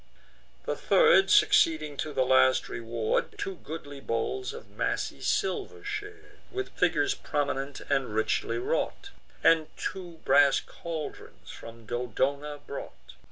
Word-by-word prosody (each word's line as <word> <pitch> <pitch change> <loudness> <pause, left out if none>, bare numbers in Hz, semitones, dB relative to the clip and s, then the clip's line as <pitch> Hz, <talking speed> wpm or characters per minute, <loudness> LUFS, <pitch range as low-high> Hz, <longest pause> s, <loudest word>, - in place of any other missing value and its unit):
The - - -1
third, 465 -5 +5
succeeding 410 - +4
to 155 - -3
the 130 -3 +1
last 130 0 +4
reward, 115 -1 -2
Two 190 -2 -4
goodly 145 -4 -8
bowls 135 - -2
of 465 +2 -10
massy - - -2
silver 425 0 -1
shar'd, 415 0 -7
With 390 +1 -3
figures 395 0 +2
prominent, 140 - -2
and 135 -6 -1
richly 110 - 0
wrought, 400 0 -2 0.3
And 160 -2 +5
two 180 -3 -5
brass 140 0 +5
caldrons 160 -3 -8
from 115 0 -11
Dodona 135 +6 -2
brought. 60 - -9
150 Hz, 120 wpm, -28 LUFS, -, 0.3 s, third